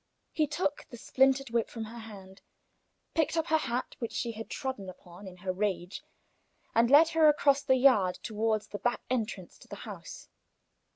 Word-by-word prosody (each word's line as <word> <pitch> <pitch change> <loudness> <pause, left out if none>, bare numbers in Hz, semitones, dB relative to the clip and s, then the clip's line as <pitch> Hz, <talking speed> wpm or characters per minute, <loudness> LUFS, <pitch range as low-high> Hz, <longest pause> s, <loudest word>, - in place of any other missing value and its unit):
He 305 -1 +1
took 295 0 -2
the 240 - -10
splintered 265 +1 +2
whip 235 -1 0
from 225 - -6
her 230 +2 -9
hand, 195 -4 -12 0.7
picked 325 0 +1
up 325 - +1
her 315 0 +4
hat 245 -3 -3
which 230 - -4
she 235 - -2
had 225 0 -8
trodden 260 -9 -4
upon 180 +2 -13
in 180 -1 -11
her 185 0 -3
rage, 185 -2 -2 0.7
and 230 +1 +4
led 305 +4 +7
her 320 -1 +4
across 285 -1 +3
the 260 - +3
yard 245 -9 +4
toward 220 -1 0
the 205 - -8
back 240 0 -1
entrance 215 -7 -3
to - - -17
the - - -8
house. - - -9
230 Hz, 180 wpm, -30 LUFS, 205-275 Hz, 0.7 s, led